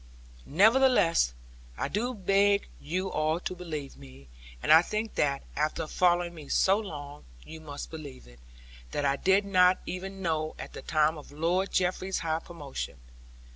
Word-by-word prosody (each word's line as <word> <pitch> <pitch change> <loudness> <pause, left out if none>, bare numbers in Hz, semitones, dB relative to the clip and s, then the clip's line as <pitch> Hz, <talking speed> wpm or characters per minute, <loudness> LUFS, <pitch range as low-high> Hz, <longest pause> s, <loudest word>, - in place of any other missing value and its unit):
Nevertheless, 215 - +4 0.5
I - - -1
do 240 +5 -2
beg 200 +1 +3
you 185 +5 -2
all 155 +2 0
to - - -3
believe 155 -6 -6
of - - -18
me 65 -1 -14 0.3
and - - +6
I 160 - +9
think 215 +5 -3
that, 140 -1 0
after 155 +2 -1
following 175 +1 +2
me 155 -4 -11
so 195 +2 +3
long, 145 -8 -8 0.2
you 160 - -10
must 145 -2 -8
believe 145 -5 -9
it - - -17 0.5
that 145 - -1
I 140 0 +2
did 190 +6 +3
not 185 -2 +4
even 195 +1 -6
know 155 -2 -1
at - - -8
the - - -7
time 155 0 +1
of 145 - -14
Lord 170 +6 0
Jeffreys's 185 +1 0
high 160 -1 -1
promotion. 155 - -7
165 Hz, 165 wpm, -29 LUFS, 150-190 Hz, 0.5 s, I